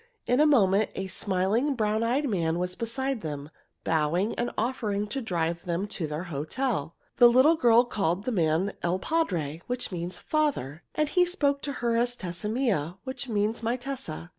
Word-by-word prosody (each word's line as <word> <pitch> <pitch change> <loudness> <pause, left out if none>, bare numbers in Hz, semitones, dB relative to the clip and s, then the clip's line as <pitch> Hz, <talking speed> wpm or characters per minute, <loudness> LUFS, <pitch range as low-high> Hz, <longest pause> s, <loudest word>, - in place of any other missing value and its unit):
In 250 +2 +2
a 305 - +6
moment 210 -7 +4
a 190 - -3
smiling, 195 +8 0
brown 215 -1 0
eyed 255 +6 +1
man 170 -7 0
was 180 +1 -2
beside 265 +2 -2
them, 145 -1 -6 0.3
bowing 165 +6 +1
and 240 - -1
offering 215 -4 -1
to 270 +4 -2
drive 170 -5 -1
them 175 +2 -1
to 165 -6 -3
their 150 +3 -4
hotel. 165 - -2 0.2
The 245 - +9
little 260 +7 +6
girl 240 -4 +5
called 195 -5 -1
the 255 - -2
man 170 0 +1
il 175 +2 +1
padre, 175 - -1
which 250 -2 -2
means 175 0 -4
"father," 270 - -1
and 305 - +2
he 360 +4 +3
spoke 290 -6 +1
to 285 - -3
her 230 -1 +2
as 240 +1 +1
Tessa 185 0 -4
mia, 200 - 0
which 260 -1 -5
means 215 +1 0
"my 230 +2 0
Tessa." 245 - -6
210 Hz, 180 wpm, -27 LUFS, 175-255 Hz, 0.3 s, The